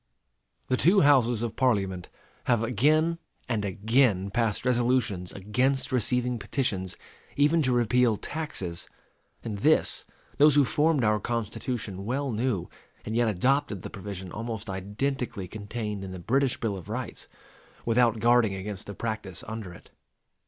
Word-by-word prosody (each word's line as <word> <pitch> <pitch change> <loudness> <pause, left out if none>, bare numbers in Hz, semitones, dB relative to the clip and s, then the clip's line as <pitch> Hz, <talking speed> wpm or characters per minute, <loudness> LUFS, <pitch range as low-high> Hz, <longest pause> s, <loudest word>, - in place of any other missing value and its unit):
The 130 - +1
two 190 +8 +5
Houses 125 -5 +4
of 115 - -3
Parliament 95 -8 0 0.4
have 120 -2 +2
again 155 +9 +2 0.3
and 115 -4 -1
again 100 0 +2
passed 115 +1 0
resolutions 120 -7 +1
against 125 +7 0
receiving 125 0 +1
petitions 100 -4 -2 0.4
even 150 +3 +4
to 130 -3 +1
repeal 120 -1 +3
taxes; 100 - -5 0.6
and 105 -4 -4
this, 155 +9 +2 0.4
those 150 0 +7
who 145 -2 +5
formed 150 +3 +2
our 105 -1 +3
Constitution 110 -3 -3
well 135 +5 -1
knew, 110 -4 -1 0.4
and 110 - -3
yet 120 0 +3
adopted 110 0 +1
the - - -7
provision 95 -3 -7
almost 110 -2 -5
identically 105 +2 -3
contained 105 0 -5
in 95 - -6
the 95 - -6
British 130 +9 +1
Bill 110 -4 -1
of 90 +1 -10
Rights, 125 +3 -5 0.6
without 115 -1 +3
guarding 115 -3 +4
against 95 0 -5
the 100 - -7
practice 110 -5 -4
under 110 -4 -6
it. 85 - -15
115 Hz, 140 wpm, -27 LUFS, 100-130 Hz, 0.6 s, those